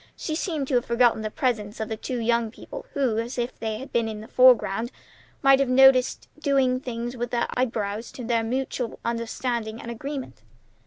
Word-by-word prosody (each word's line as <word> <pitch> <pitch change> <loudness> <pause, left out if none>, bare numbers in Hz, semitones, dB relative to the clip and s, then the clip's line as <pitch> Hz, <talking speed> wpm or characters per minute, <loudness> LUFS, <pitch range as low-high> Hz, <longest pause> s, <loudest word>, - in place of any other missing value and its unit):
She 310 - -3
seemed 310 -4 -2
to - - -2
have 245 -1 +3
forgotten 235 -1 +3
the 215 - -2
presence 220 -5 -2
of 220 - -2
the 220 - -3
two 245 +3 -4
young 235 0 +1
people, - - -10
who, 255 -6 +1
if 240 +1 -3
they 220 -1 -2
had 265 +4 -9
been 230 -1 +2
in 215 -1 -5
the 220 - -10
foreground, 240 -3 +4 0.5
might 275 0 +6
have 275 - +2
been 255 - +1
noticed 265 -1 +5
doing 270 -4 +2
things 240 -1 -5
with 240 -1 -3
their 240 -1 0
eyebrows 225 -3 -2
to 250 - -7
their 230 0 +1
mutual 250 0 -2
understanding 230 -1 -2
and 235 - -6
agreement. 265 - -6
240 Hz, 195 wpm, -25 LUFS, 225-260 Hz, 0.5 s, might